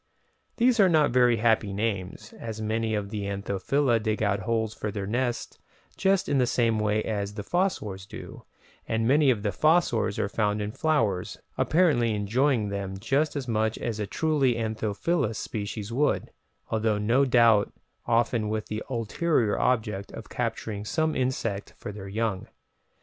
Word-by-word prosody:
These 245 -1 +3
are 195 -2 +6
not 155 -5 +4
very 120 -1 +4
happy 110 -3 +2
names, 105 0 -3
as 110 -2 -6
many 110 0 -1
of 100 -1 -3
the 105 -2 -3
Anthophila 100 +6 0
dig 110 0 -1
out 100 -1 +1
holes 110 +2 -1
for 105 - -4
their 100 -1 -4
nests 120 +3 -2 0.4
just 195 0 +2
in 140 -2 +2
the 125 - +3
same 115 -3 +1
way 105 0 +1
as 105 -2 -3
the 105 - -5
fossors 105 - -1
do, - - -10 0.4
and 115 0 0
many 145 +2 +4
of 110 -5 +1
the 105 - 0
fossors 155 - +2
are - - 0
found 105 0 0
in 105 0 -3
flowers, 110 - 0 0.2
apparently 140 -10 +2
enjoying 115 +2 +1
them 100 -1 -4
just 135 +10 0
as 135 -3 -3
much 110 -1 0
as 115 -2 -3
a 105 - -2
truly 145 -5 +1
anthophilous 110 - -1
species 105 +1 -5
would, 145 +5 0 0.4
although 110 -1 +1
no 115 +6 +3
doubt 115 -5 +4 0.4
often 115 -2 +1
with 110 0 -3
the 110 0 -3
ulterior 120 0 0
object 110 -5 0
of - - -9
capturing 105 -2 -3
some 160 +8 0
insect 115 -6 -2
for - - -6
their 100 -1 -8
young! 105 -1 -2
110 Hz, 160 wpm, -27 LUFS, 105-130 Hz, 0.4 s, are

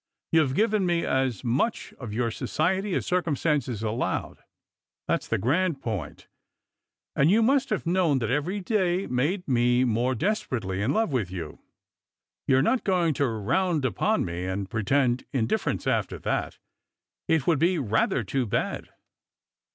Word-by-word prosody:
You've 150 -5 +3
given 210 -2 +2
me 170 -1 +1
as 130 -4 0
much 130 - -1
of 120 -5 -6
your 115 +2 -1
society 190 - -1
as - - -1
circumstances 150 - 0
allowed 110 +2 -2 0.3
— - - -66
that's - - 0
the - - 0
grand 155 - +1
point 90 - -5 0.5
— - - -62
and 140 +3 +4
you 220 +4 +4
must 270 +3 +2
have 215 - -1
known 170 -4 +2
that 120 -2 -1
every 170 +9 -1
day 185 -2 0
made 150 +10 -1
me 125 -1 +3
more 125 +2 +1
desperately 115 - -2
in 110 +7 +1
love 220 0 +1
with 115 -9 -1
you. 85 -4 -7 0.9
You're 135 0 +4
not 255 - +1
going 175 -5 +2
to 140 0 +1
round 130 - 0
upon 125 - +1
me 85 +1 -4
and 95 +1 -3
pretend 120 +4 +1
indifference 115 -5 -1
after - - 0
that. - - -2 0.7
It 160 -5 +2
would 165 -5 +2
be 175 +3 +3
rather 115 -2 +1
too 125 +4 -1
bad." - - -2
135 Hz, 155 wpm, -26 LUFS, 115-180 Hz, 0.9 s, and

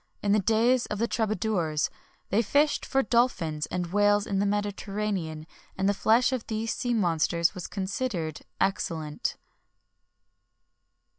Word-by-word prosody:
[XXI - - -44
29] - - -9
In 200 - +3
the 210 -1 +3
days 235 +4 +3
of 210 - -3
the 230 +3 +1
troubadours, 215 -9 0 0.4
they 205 +4 +3
fished 290 +7 +2
for 270 0 +2
dolphins 200 -11 +1
and 180 -1 -3
whales 205 0 +4
in 195 -1 -1
the 200 - +2
Mediterranean, 200 -5 -2 0.3
and 190 +1 +1
the 200 - +3
flesh 230 +6 +3
of 255 -4 -3
these 225 0 -2
sea 245 -1 -1
monsters 170 -3 +2
was 180 -3 -6
considered 190 - -3 0.2
excellent. 160 -6 -1
205 Hz, 145 wpm, -27 LUFS, 175-225 Hz, 0.4 s, whales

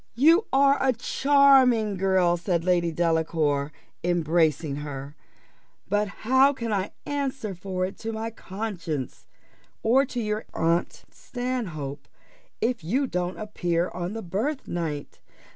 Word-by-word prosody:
"You 325 - +5
are 275 +1 +4
a 265 -1 +3
charming 260 -4 +4
girl," 185 -2 +2
said 175 -1 -1
Lady 175 -2 +2
Delacour, 160 -3 0 0.3
embracing 160 -3 +1
her; 145 -1 -7 0.7
"but 205 +2 +1 0.2
how 260 +4 +5
can 230 -4 -3
I 195 0 -2
answer 270 -7 -3
for 185 +1 -3
it 190 - -7
to 225 - -4
my 225 +1 -4
conscience, 185 - -5 0.6
or 250 +5 +4
to 245 - -4
your 215 -1 -2
aunt 170 +1 0
Stanhope, 190 - -5 0.5
if 235 -6 0
you 255 - +1
don't 180 -5 -2
appear 175 -5 -1
on 180 +2 -4
the 225 - -5
birthnight? 175 - -3
190 Hz, 125 wpm, -26 LUFS, 170-245 Hz, 0.7 s, You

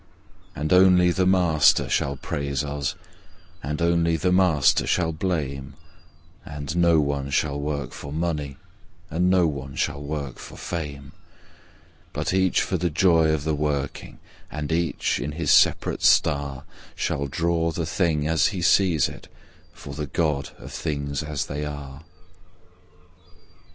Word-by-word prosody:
And 75 +4 -1
only 90 -1 +6
The 90 +1 +1
Master 90 -5 +4
shall 70 0 0
praise 70 +1 -3
us, 70 -1 -3 0.7
and 75 +3 -4
only 85 -1 +2
The 90 +4 0
Master 90 -7 +3
shall 80 -3 +1
blame; 70 -6 -3 0.7
Andd 75 +1 -6
no 85 -2 +4
one 70 -2 -1
shall 70 +1 0
work 70 0 -3
for 70 - -8
money, 75 -4 -3 0.5
and 90 +3 +1
no 90 -2 +4
one 70 -3 -4
shall 70 - -2
work 70 -3 -5
for - - -10
fame, 70 -5 -6 1.0
But - - -2
each 95 -1 +2
for 95 - -1
the 90 +1 0
joy 80 -1 +3
of 75 -2 -1
the 80 0 0
working, 70 -2 -3 0.3
and 75 0 -5
each, 85 -2 0
in 75 +1 -4
his 75 -2 0
separate - - +3
star, 70 -2 +2 0.3
Shall 70 0 -2
draw 85 +2 0
the 80 0 -3
Thing 80 -3 0
as 80 -1 +3
he 95 -5 -3
sees 85 -3 +3
It - - -11 0.4
for 85 -5 -10
the 75 0 -4
God 75 -1 -1
of - - -11
Things 70 -2 -3
as 75 -2 -3
They 75 +1 -4
are! 70 -1 -7
75 Hz, 145 wpm, -24 LUFS, 70-85 Hz, 1.0 s, only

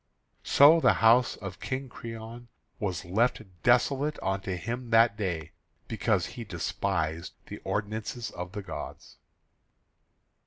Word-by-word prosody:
So 150 +4 +7
the - - +5
house 115 +2 +4
of 95 -4 -8
King 135 +5 -4
Creon 115 0 -9 0.3
was 90 -6 -3
left 110 +6 +1 0.2
desolate 140 +4 +2
unto 95 -1 -1
him 115 +7 -5
that 115 -1 +5
day, 90 -8 -3 0.4
because - - 0
he - - -7
despised 80 +1 -2
the - - -8
ordinances 110 +3 -3
of 90 +1 -7
the 105 -1 -5
gods. 95 - -8
110 Hz, 120 wpm, -28 LUFS, 95-120 Hz, 0.4 s, So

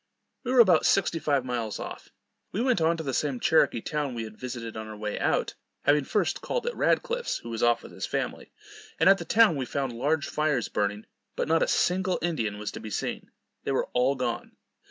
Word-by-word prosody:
We 250 - -2
were 255 -2 +8
about 180 -8 +5
sixty 175 -4 +2
five 140 -4 +1
miles 120 -4 -2
off. - - -7 0.4
We 200 - -3
went 245 -6 +2
on 165 +1 +3
to 160 - -4
the 135 -3 -3
same 140 -2 -1
Cherokee 140 -6 +3
town 145 -3 -2
we 115 - -3
had 110 -1 -9
visited 120 -2 -6
on 110 0 -6
our 110 -1 -8
way 105 0 -3
out, - - +1 0.3
having 145 -1 +3
first 210 - 0
called - - -2
at 485 - -2
Radcliff's, 485 0 0
who 115 - -9
was 115 - -3
off 120 0 +3
with - - -11
his - - -5
family; - - -3 0.5
and 160 - +4
at 195 +1 +7
the - - -6
town 220 -7 +5
we 130 - -2
found 135 0 -2
large 145 +6 0
fires 150 -6 0
burning, 105 +1 -1 0.3
but - - -1
not 165 +1 +3
a - - +3
single 185 0 +1
Indian 115 -12 -1
was 105 0 -4
to - - -7
be 110 - -7
seen. - - -4 0.3
They - - -2
were - - 0
all 125 +3 +3
gone. 120 -3 -3
140 Hz, 220 wpm, -27 LUFS, 115-170 Hz, 0.5 s, were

